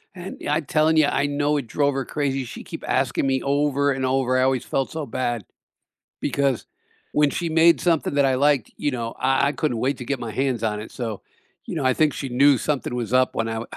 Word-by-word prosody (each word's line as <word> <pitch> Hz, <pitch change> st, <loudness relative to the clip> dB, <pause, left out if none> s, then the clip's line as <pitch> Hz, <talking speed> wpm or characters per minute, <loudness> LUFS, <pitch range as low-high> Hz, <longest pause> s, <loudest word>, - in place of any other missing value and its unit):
And 180 Hz, +1 st, -8 dB
yeah, 145 Hz, -, -2 dB
I'm 155 Hz, -2 st, -2 dB
telling 155 Hz, +1 st, +2 dB
you, 150 Hz, -2 st, +5 dB
I 145 Hz, -, +1 dB
know 145 Hz, +1 st, 0 dB
it 130 Hz, -5 st, -4 dB
drove 145 Hz, +2 st, +1 dB
her 135 Hz, -, -2 dB
crazy. 135 Hz, -3 st, -1 dB
She'd -, -, -9 dB
keep -, -, -8 dB
asking 135 Hz, -, +1 dB
me 130 Hz, -1 st, +1 dB
over 140 Hz, 0 st, +1 dB
and 130 Hz, -1 st, -1 dB
over, 130 Hz, -1 st, +1 dB
I -, -, +3 dB
always 130 Hz, -2 st, +1 dB
felt 135 Hz, -, -1 dB
so 160 Hz, -2 st, -4 dB
bad 120 Hz, -3 st, -2 dB, 0.8 s
because 135 Hz, -2 st, 0 dB, 0.5 s
when 150 Hz, -1 st, +3 dB
she 170 Hz, -, -2 dB
made 165 Hz, +1 st, +5 dB
something 165 Hz, -5 st, +1 dB
that 140 Hz, -1 st, +3 dB
I 130 Hz, -, +2 dB
liked, 140 Hz, -4 st, +2 dB
you 145 Hz, -, -1 dB
know, 115 Hz, -2 st, -3 dB
uh, -, -, -21 dB, 0.2 s
I 140 Hz, +1 st, +2 dB
couldn't 150 Hz, -6 st, -1 dB
wait 130 Hz, +3 st, 0 dB
to 125 Hz, -, -6 dB
get 135 Hz, 0 st, -2 dB
my 115 Hz, -2 st, -4 dB
hands 130 Hz, -4 st, -1 dB
on 105 Hz, -1 st, -1 dB
it, 110 Hz, -, -9 dB
so, 115 Hz, -5 st, -5 dB, 0.4 s
you -, -, -5 dB
know, 140 Hz, -, -1 dB
I 130 Hz, -, +3 dB
think 155 Hz, -2 st, +2 dB
she 135 Hz, -, -5 dB
knew 135 Hz, +1 st, +4 dB
something 145 Hz, -2 st, -2 dB
was 120 Hz, -2 st, -3 dB
up 130 Hz, 0 st, +3 dB
when 115 Hz, 0 st, 0 dB
I 115 Hz, 0 st, -3 dB
135 Hz, 240 wpm, -23 LUFS, 125-145 Hz, 0.8 s, you